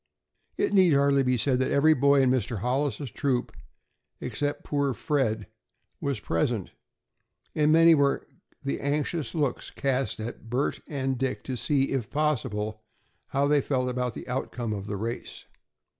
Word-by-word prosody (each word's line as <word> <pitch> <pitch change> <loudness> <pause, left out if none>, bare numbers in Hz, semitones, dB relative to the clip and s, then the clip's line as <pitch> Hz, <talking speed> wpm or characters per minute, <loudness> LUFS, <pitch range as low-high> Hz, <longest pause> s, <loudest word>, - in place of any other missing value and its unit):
It - - 0
need 185 -5 +6
hardly 140 0 +4
be 125 -1 +2
said 125 +2 +2
that 130 - +1
every 155 +3 +5
boy 140 -1 +4
in 130 - +4
Mr. 120 -3 0
Hollis's 130 +4 -1
troop, 125 +2 -1 0.6
except 145 0 -3
poor 140 -3 0
Fred, 115 -8 0 0.5
was 140 -5 -2
present, 100 +3 -1 0.8
and 150 0 +3
many 165 +1 +7
were 140 -2 +2 0.4
the 140 - -2
anxious 150 +3 -1
looks 145 -6 -1
cast 135 -3 -1
at 115 0 -7
Bert 125 +4 0
and 135 -3 -2
Dick 130 -1 -2
to 130 - -4
see, 135 +2 +1
if 125 -4 -2
possible, 110 -8 -1 0.5
how 140 +1 +1
they 145 -1 +4
felt 130 -2 0
about 125 -1 -2
the - - -8
outcome 125 -3 -3
of 100 -1 -5
the 105 - -3
race. 115 +4 -5
135 Hz, 155 wpm, -27 LUFS, 120-145 Hz, 0.8 s, many